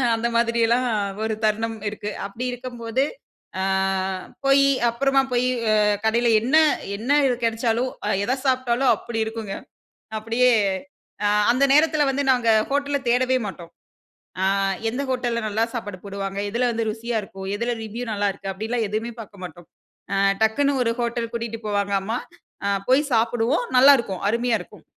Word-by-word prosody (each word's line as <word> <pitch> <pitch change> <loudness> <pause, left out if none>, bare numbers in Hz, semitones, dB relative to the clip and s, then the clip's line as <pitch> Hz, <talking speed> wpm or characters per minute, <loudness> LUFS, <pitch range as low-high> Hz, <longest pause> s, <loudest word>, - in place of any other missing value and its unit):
அந்த 230 +1 -1
மாதிரியெல்லாம் 235 +1 +2 0.4
ஒரு 220 0 -1
தருணம் 225 +1 0
இருக்கு. 210 0 -6 0.2
அப்படி 220 +5 -6
இருக்கம்போது, 245 0 -3 0.6
அ - - 0 0.8
போயி 275 0 +5 0.2
அப்புறமா 270 +3 +2
போயி 245 +1 +2 0.2
ஆ - - +4 0.3
கடைல 235 +2 +2
என்ன 260 +7 +1 0.4
என்ன, 240 +6 -3 0.3
கெடைச்சாலும் 230 +2 0 0.2
அ - - 0
எத 255 +5 0
சாப்ட்டாலும் 255 -1 +2
அப்பிடி 225 +2 -5
இருக்குங்க. 220 -3 -5 0.6
அப்பிடியே 230 +3 +2 0.7
அ - - +4 0.2
அந்த 265 +3 +2
நேரத்தில 305 -1 +4
வந்து 280 +1 0
நாங்க 245 -2 0 0.2
ஹோட்டல 285 0 0
தேடவே 255 +2 +3
மாட்டோம். 175 -3 -8 0.7
ஆ - - +1 0.5
எந்த 260 +4 -3
ஹோட்டல்ல 240 -2 -1
நல்லா 220 +2 +1
சாப்பாடு 205 -5 -5
போடுவாங்க. 195 0 -5
எதுல 240 +2 +1
வந்து 225 -1 -1
ருசியா 230 +1 -4
இருக்கும். 190 0 -9
எதுல 235 +2 -1
ரிவ்யூ 230 +3 -5
நல்லாயிருக்கு, 200 -1 -2
அப்டிலாம் 220 +3 -2
எதுவுமே 220 +3 -3
பாக்க 200 -1 -15
மாட்டோம். 175 0 -10 0.4
ஆ - - +1 0.3
டக்குன்னு 275 +5 +2
ஒரு 230 - +1
ஹோட்டல் 235 -1 -2
கூட்டிட்டு 230 -1 -4
போவாங்க 200 -1 -1
அம்மா! 225 +5 -2 0.5
அ - - +2 0.2
போய் 280 +2 +3
சாப்பிடுவோம் 240 - +1
நல்லாருக்கும், 250 -9 +5
அருமையா 235 +1 +1
இருக்கும். - - -13
235 Hz, 145 wpm, -23 LUFS, 220-250 Hz, 0.8 s, போயி